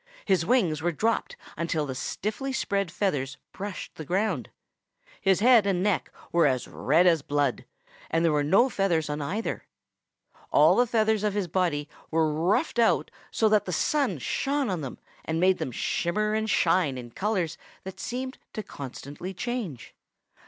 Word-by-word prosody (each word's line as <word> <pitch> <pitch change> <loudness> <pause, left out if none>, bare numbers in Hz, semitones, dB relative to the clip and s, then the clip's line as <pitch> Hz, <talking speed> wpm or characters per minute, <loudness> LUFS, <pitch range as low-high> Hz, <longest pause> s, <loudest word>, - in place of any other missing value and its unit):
His 190 -4 +3
wings 180 - +2
were 175 +2 +1
dropped 225 +8 -1 0.2
until 160 -2 -1
the 135 - -4
stiffly 215 - -3
spread 200 -7 -1
feathers 140 -9 -1
brushed 200 -1 -6
the 160 - -8
ground. 180 - -1 0.7
His 195 0 +3
head 235 -3 +6
and 185 -2 +1
neck 205 -4 0 0.2
were 170 -3 +4
as 130 -2 0
red 160 +6 +2
as 165 -4 +4
blood, 145 -2 0 0.4
and 165 +1 +1
there 165 - +4
were 150 -1 +2
no 195 - +4
feathers 175 - 0
on 150 0 -3
either. 195 +10 -3 0.8
All - - +6
the 245 0 +3
feathers 220 -2 +2
of 210 -1 0
his 200 -3 0
body 165 -4 0 0.2
were 160 -1 +2
ruffed 185 - +1
out 230 - +3 0.2
so 220 - +2
that 210 -1 +3
the 180 - -3
sun 260 - +1
shone 275 - -1
on 175 -3 -2
them 135 -3 -6 0.3
and 160 0 -2
made 185 +1 +3
them 130 - -3
shimmer 210 - 0
and 220 0 0
shine 170 -9 +2
in 120 -2 -8
colors 185 - -1 0.2
that 190 0 -8
seemed 260 +2 -4
to 215 - -4
constantly 145 +6 -8
change. 220 - -4
185 Hz, 165 wpm, -27 LUFS, 155-215 Hz, 0.8 s, head